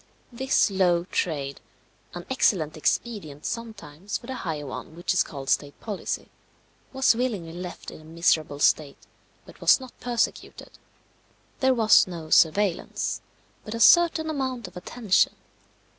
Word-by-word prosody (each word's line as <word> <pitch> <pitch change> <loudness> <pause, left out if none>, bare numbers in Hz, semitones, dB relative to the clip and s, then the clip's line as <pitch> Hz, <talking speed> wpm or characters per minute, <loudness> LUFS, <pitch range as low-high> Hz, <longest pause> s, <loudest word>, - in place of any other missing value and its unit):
This 260 -3 +2
low 180 -3 +2
trade, 145 -6 -3 0.5
an 175 - -7
excellent 185 - +1
expedient 155 -3 -2
sometimes 205 -6 -5
for - - -15
the 260 - -5
higher 160 - -4
one 140 +3 -8
which 175 +2 -1
is 185 - +3
called 135 -3 -5
state 145 +1 0
policy, 210 -4 -5 0.6
was 265 -3 +3
willingly 210 -10 -2
left 180 0 -8
in - - -12
a - - -17
miserable 160 -2 0
state, 145 0 +2 0.5
but - - -16
was - - +6
not 260 -2 -11
persecuted. 240 -2 -3 0.8
There 260 -1 +3
was 220 -4 +5
no 165 -3 -8
surveillance, 185 +2 +2 0.4
but 215 - -6
a - - -4
certain 330 +5 +5
amount 260 -6 -3
of - - -15
attention. 195 +2 +1
185 Hz, 140 wpm, -25 LUFS, 155-235 Hz, 0.8 s, was